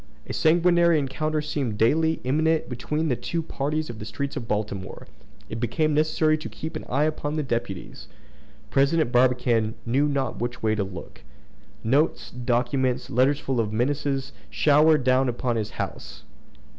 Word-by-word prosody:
A - - -6
sanguinary 170 0 +4
encounter 155 +2 -1
seemed 135 -8 -2
daily 160 +8 +2
imminent 155 +4 +1
between 150 +6 -2
the 130 - +1
two 165 +6 -3
parties 155 +1 -2
in 115 -2 -8
the 105 - -7
streets 135 +6 -4
of 115 - -5
Baltimore. 105 -3 -3 0.4
It - - -6
became 135 +7 0
necessary 155 +1 +2
to - - -6
keep 160 +1 -7
an 155 - -5
eye 140 +4 +2
upon 155 -1 -1
the 155 - 0
deputies. 120 -7 -4 0.6
President 140 0 +2
Barbicane 120 -3 +2
knew 135 +5 +2
not 140 -2 -2
which 120 0 -4
way 110 -1 +2
to 105 -2 0
look. 95 -3 -9 0.6
Notes, 140 +8 +1
documents, 125 +1 0
letters 135 +4 +3
full 130 -3 -2
of 110 -2 0
menaces 135 +3 -1 0.2
showered 150 - +4
down 130 0 +3
upon 120 0 -1
his 110 -2 -2
house. - - -6
135 Hz, 155 wpm, -25 LUFS, 120-155 Hz, 0.6 s, sanguinary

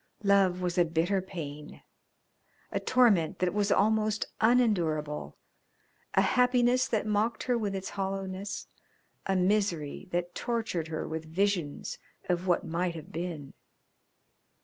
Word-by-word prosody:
Love 195 -2 +3
was 180 0 0
a - - +7
bitter 170 +4 +1
pain, 150 -5 -8 0.9
a - - 0
torment 220 -11 +3
that 180 -1 0
was 205 -1 +1
almost 215 0 +2 0.2
unendurable, 175 -11 +1 0.8
a - - +6
happiness 250 0 +3
that 220 -3 0
mocked 215 +2 0
her 250 - +1
with 210 -4 -1
its 190 0 -4
hollowness, 195 0 -4 0.6
a 195 - +1
misery 185 -4 0
that 175 0 -2
tortured 225 -9 -2
her 160 -1 -4
with 160 0 -4
visions 175 -2 -1 0.3
of 180 +1 0
what 175 - +2
might 170 +1 -1
have 165 +4 -9
been. 165 -5 -5
190 Hz, 125 wpm, -29 LUFS, 170-210 Hz, 0.9 s, a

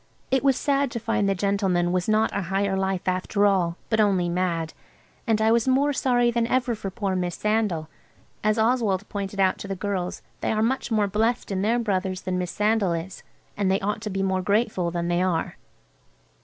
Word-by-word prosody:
It 265 0 +2
was 270 -2 +4
sad 280 -1 +1
to 235 - -4
find 225 -3 0
the 195 - +1
gentleman 190 -3 +1
was 180 +2 0
not 215 +1 +2
a 200 - 0
Higher 195 0 0
Life 190 -1 -1
after 185 +3 +1
all, 180 -4 +2
but 220 - 0
only 190 -4 +2
mad. 170 -2 -1 0.5
And 220 -2 +2
I 220 +1 +3
was 235 +1 +2
more 280 +3 +3
sorry 245 -3 +2
than 235 -1 0
ever 250 -1 +1
for 205 -3 -5
poor 195 -1 -2
Miss 180 -2 -2
Sandal. 210 -7 0 0.6
As 215 +1 +2
Oswald 220 -4 +1
pointed 200 -1 -4
out 190 -1 +2
to - - -7
the 195 - -3
girls 185 -2 -3 0.2
they - - -1
are 215 0 +1
much 260 +3 0
more 215 -3 +2
blessed 220 +4 0
in 190 -1 -1
their 225 +4 +2
brothers 190 -5 -1
than 185 -1 -2
Miss 180 -1 -2
Sandal 210 -3 +1
is, 170 +3 -5 0.3
and 200 -2 0
they 190 +1 +2
ought 210 +2 -2
to 215 - -4
be 195 -1 -2
more 190 -1 0
grateful 200 -2 +1
than 170 0 -2
they 175 +1 +1
are. 180 -3 -1
200 Hz, 210 wpm, -25 LUFS, 185-225 Hz, 0.6 s, was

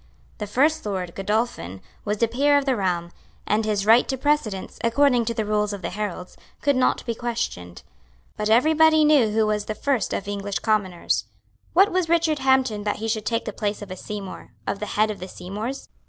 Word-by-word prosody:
The 210 - -4
First 300 +9 +2
Lord, 185 -4 -3
Godolphin, 195 - -2 0.3
was 210 +2 -1
a - - +5
peer 285 +5 +3
of 285 - 0
the 265 -2 +2
realm; 175 -4 -1 0.3
and 215 +2 +1
his 205 -2 0
right 230 +3 +6
to 265 - -2
precedence, 260 -9 -1
according 245 0 +3
to 230 +1 -2
the 220 - -1
rules 210 0 0
of 195 -2 -7
the 170 - -3
heralds, 185 -2 -5 0.2
could 285 -2 +2
not 255 - +1
be 235 - -1
questioned. 225 - -4 0.5
But 210 0 -2
every 250 +8 +4
body 315 0 +5
knew 290 -7 +5
who 220 0 +2
was 210 -1 -1
the 215 - -4
first 265 +1 0
of 195 - -3
English 200 -1 -3
commoners. 205 -6 0 0.5
What 390 +3 +5
was 360 -2 0
Richard 330 -3 +2
Hampden 260 -5 +2
that 205 - -1
he 225 - -4
should 215 -1 -2
take 230 0 -1
the 215 - -4
place 205 0 -3
of 200 - -10
a - - -4
Seymour, 200 0 -8
of 200 - -2
the 210 - -4
head 215 0 +3
of 210 - -8
the 185 - -6
Seymours? 210 +10 -6
215 Hz, 210 wpm, -24 LUFS, 205-265 Hz, 0.5 s, right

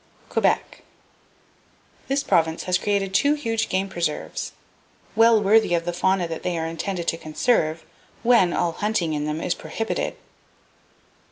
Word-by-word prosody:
Quebec. - - 0 1.3
—This 275 +1 0
province 165 - +1
has 180 0 +1
created 200 -1 -1
two 285 +8 +3
huge 230 -6 -2
game 190 +1 0
preserves, 170 -5 -3 0.6
well 225 0 +6
worthy 210 -2 +4
of 170 0 -1
the 175 - -2
fauna 180 0 +1
that 165 -1 -5
they 180 -1 -2
are 160 - -2
intended 170 +2 -4
to 165 - -2
conserve 160 -1 0 0.4
when 230 -7 +5
all 170 - 0
hunting 190 -4 -1
in 150 0 -2
them 150 +1 -2
is 175 - 0
prohibited! 225 +4 -3
180 Hz, 145 wpm, -23 LUFS, 165-220 Hz, 1.3 s, well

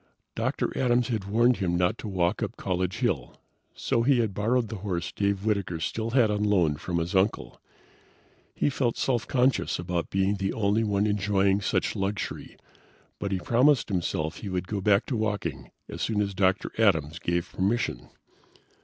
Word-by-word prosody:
Dr. - - -2
Adams 125 -1 +2
had 110 -5 -2
warned 115 +4 +3
him 90 -3 0
not 90 +5 +1
to - - -6
walk 90 0 0
up - - -3
College 90 -1 -2
Hill, - - -1 0.4
so 115 - 0
he 130 +2 +3
had 110 -4 0
borrowed 115 +3 0
the 110 - -5
horse 90 -3 -3
Dave 100 0 -1
Whitaker 100 -6 -1
still 110 +7 -2
had 115 -3 +3
on 105 0 0
loan 90 -8 +2
from 85 +2 -3
his 85 +1 -2
uncle. 95 +3 0 0.9
He 145 - +1
felt 125 -3 0
self 120 -3 0
conscious 130 0 +1
about 90 -1 -3
being 95 +1 +1
the 95 0 -1
only 105 +1 +1
one 100 -1 +1
enjoying 100 -1 +2
such 95 - 0
luxury, 100 +1 -4 0.6
but 100 - -3
he 95 - +1
promised 125 +8 +3
himself 80 -4 -2
he 105 - -6
would 90 -1 -3
go 100 0 -3
back 100 +2 +3
to 130 - -2
walking 110 -2 -2 0.2
as - - -7
soon 110 -2 0
as 100 -1 0
Dr. 95 0 +1
Adams 80 -7 +2
gave 85 0 -2
permission. 95 - -1
100 Hz, 175 wpm, -27 LUFS, 90-110 Hz, 0.9 s, warned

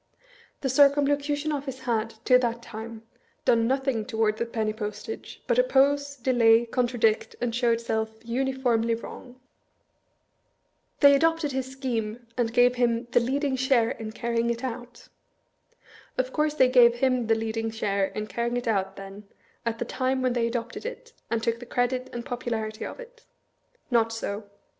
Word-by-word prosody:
The 270 - -1
Circumlocution 285 +2 +3
Ofllce 270 -3 -4
had, 225 -3 0 0.2
to 250 0 +6
that 235 -1 -2
time, 225 0 -8 0.4
done 230 -1 +4
nothiag 265 -4 0
toward 220 -3 +1
the 235 - -2
penny 220 -2 -1
postage, 210 - -7
but - - +2
oppose, 285 - +3
delay, 235 -2 +4
contradict, 235 -2 +1
and 240 -1 -1
show 240 0 +1
itself 220 -1 -1
uniformly 240 -2 0
wrong. 245 +2 -10 1.6
"They 285 -1 +8
adopted 325 +1 +2
his 265 0 -3
scheme, 240 -3 -3
and 235 -2 0
gave 245 +1 +4
him 240 -1 +1
the 245 - +5
leading 265 +3 0
share 260 -3 +2
in 220 -1 -6
carrying 235 +1 -1
it 235 +1 -2
out." 245 -1 -6 1.1
Of 255 0 -1
course 300 0 +1
they 260 -4 +5
gave 245 -2 +6
him 255 -2 +1
the 225 - +4
leading 225 0 -2
share 200 -3 0
in 210 +2 -5
carrying 235 +2 -2
it 245 - -4
out, 195 -3 0
then, 195 +1 -10 0.4
at 230 0 -1
the 240 - -3
time 260 +2 -1
when 255 -1 +2
they 235 -1 +1
adopted 235 0 -4
it, 485 0 -7 0.2
and 230 -1 -1
took 230 0 0
the 245 - -10
credit 250 +1 -1
and 240 0 -6
popularity 230 -4 -3
of - - -9
it? 485 -1 -13 0.6
Not 230 -1 +3
so. 215 -2 -4
240 Hz, 160 wpm, -26 LUFS, 225-265 Hz, 1.6 s, They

